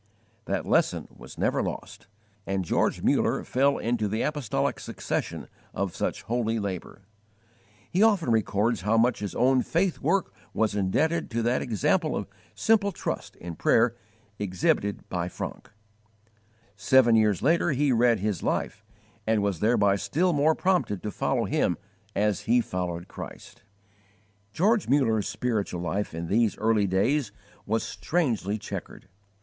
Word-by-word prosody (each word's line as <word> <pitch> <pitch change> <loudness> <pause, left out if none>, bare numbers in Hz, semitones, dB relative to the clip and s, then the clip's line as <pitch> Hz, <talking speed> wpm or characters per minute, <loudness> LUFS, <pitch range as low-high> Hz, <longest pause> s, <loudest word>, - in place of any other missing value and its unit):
That - - -2
lesson - - +1
was - - -12
never - - +1
lost, - - -6 0.4
and 95 -1 -1
George - - 0
Muller - - +2
fell 140 +2 +2
into 115 -2 -1
the 110 +3 -1
apostolic 150 -7 -1
succession - - -4 0.3
of 100 -2 -2
such - - -2
holy 115 -1 -1
labour! 100 -2 -5 0.9
He 185 - +1
often 200 - +4
records 110 -1 +1
how 105 +4 +2
much 120 +2 +3
his 100 -3 -5
own 130 +2 +3
faith 175 +5 0
work 195 -1 0 0.2
was 110 -2 +1
indebted 145 - 0
to 115 0 -1
that 120 +2 +1
example 110 -8 +1
of - - -3 0.3
simple 210 -3 +3
trust - - -5
in 85 -1 -8
prayer - - +3 0.4
exhibited 100 +1 0
by 90 -1 -2
Francke. - - -7 1.1
Seven 120 +3 +4
years 105 -5 +2
later 170 +5 +3
he 145 -1 +2
read 120 -1 +4
his 105 -4 -1
life, 110 - -2 0.4
and 110 -2 +2
was 100 -5 -1
thereby 105 -2 +3
still 155 - +1
more 155 +2 +3
prompted 180 - 0
to 105 - -3
follow - - 0
him - - +1 0.4
as 105 0 +1
he 120 +1 +5
followed 90 -5 -3
Christ. - - -10 0.9
George 205 - +2
Muller's 115 -7 +2
spiritual 105 -7 -2
life 90 +2 -2
in 85 +1 -4
these 110 +4 +1
early 110 -2 +2
days 110 +6 +1 0.4
was 115 +2 0
strangely 120 - -1
chequered. 105 - -8
110 Hz, 145 wpm, -27 LUFS, 100-135 Hz, 1.1 s, he